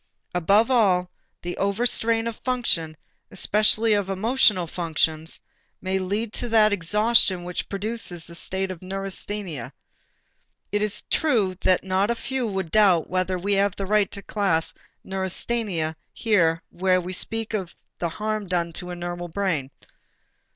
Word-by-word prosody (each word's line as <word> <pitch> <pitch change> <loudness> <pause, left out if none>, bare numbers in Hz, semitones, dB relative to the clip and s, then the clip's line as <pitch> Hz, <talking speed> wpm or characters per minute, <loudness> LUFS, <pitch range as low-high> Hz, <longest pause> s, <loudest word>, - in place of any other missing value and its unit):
Above 200 +7 +3
all, 185 -7 +3 0.3
the 175 0 -4
overstrain 225 +2 +1
of 230 -2 -4
function, 170 - 0 0.3
especially 215 +1 +3
of 205 -2 0
emotional 210 -2 +3
functions, 160 -1 -1 0.4
may 190 0 -1
lead 205 +4 -2
to 245 - -2
that 215 -2 +5
exhaustion 205 0 +2
which 180 0 -4
produces 200 -4 -3
the 170 - -8
state 190 +2 -2
of 180 - -8
neurasthenia. 195 - -5 1.0
It 205 - +1
is 210 -1 0
true 225 -12 +2
that 185 - +3
not 190 +2 +1
a 235 - +1
few 250 +1 -2
would 190 -5 -3
doubt 190 -7 +4
whether 185 0 0
we 200 +3 -1
have 200 0 +2
the 195 - -3
right 210 0 +2
to 200 - -7
class 185 -7 0 0.3
neurasthenia 190 -3 -2 0.2
here 165 -7 +2
where 185 +1 +2
we 180 +1 -5
speak 225 +4 -2
of 190 -5 -3 0.2
the 170 - -1
harm 215 +2 -3
done 170 -2 -1
to 180 - -5
the 180 - -5
normal 175 0 -5
brain. 165 -7 -1
195 Hz, 145 wpm, -24 LUFS, 175-215 Hz, 1.0 s, that